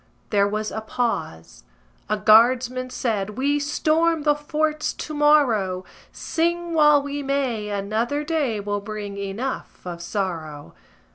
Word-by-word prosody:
There 200 -2 +3
was 215 +1 -3
a 220 - -4
pause. 160 - -3 0.5
A 215 - +1
guardsman 245 +4 +4
said: 215 -5 -2
"We 285 +2 +1
storm 310 +2 +1
the 295 0 +4
forts 305 +1 -1
to 310 - -7
morrow; 245 -12 +3 0.3
Sing 340 +1 -1
while 300 -2 +5
we 285 0 -4
may, 265 -6 -1
another 220 +8 -1
day 295 -9 -1
Will 205 0 -3
bring 205 -1 -6
enough 200 +6 -5
of 175 -1 -6
sorrow." 165 - -4
240 Hz, 130 wpm, -23 LUFS, 205-295 Hz, 0.5 s, while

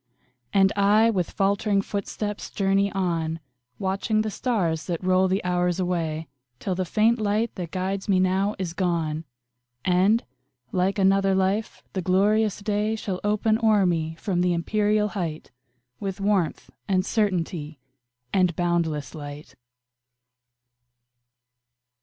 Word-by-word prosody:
And 195 0 +4
I, 210 +3 +4
with 185 -5 -1
faltering 200 0 +1
footsteps, 205 +1 -4
journey 195 0 +1
on, 165 -4 -1 0.4
Watching 195 +3 0
the 215 - -3
stars 175 - -1
that 170 0 -3
roll 185 +1 +3
the 190 +2 0
hours 180 0 0
away, 165 -3 -1 0.3
Till 190 - -2
the 185 0 -1
faint 225 +6 +2
light 215 +2 0
that 175 -3 -5
guides 190 +3 -3
me 190 -2 +4
now 190 +3 +1
is 180 -4 -3
gone, 165 -4 -1 0.6
And, 190 +5 +3 0.5
like 185 +2 +1
another 195 0 +3
life, 190 +3 0
the 190 - -1
glorious 205 +3 +2
day 210 +1 0
Shall 195 -4 -4
open 215 +1 +2
o'er 215 -3 +4
me 160 -2 0
from 175 0 -1
the 180 -1 +2
empyreal 210 +4 +1
height, 170 -6 -4 0.5
With 195 -1 -4
warmth, 195 -5 0 0.2
and 185 -2 +1
certainty, 170 -8 -1 0.6
and 180 -3 +3
boundless 165 -5 -1
light. 145 -1 -9
190 Hz, 130 wpm, -25 LUFS, 175-205 Hz, 0.6 s, And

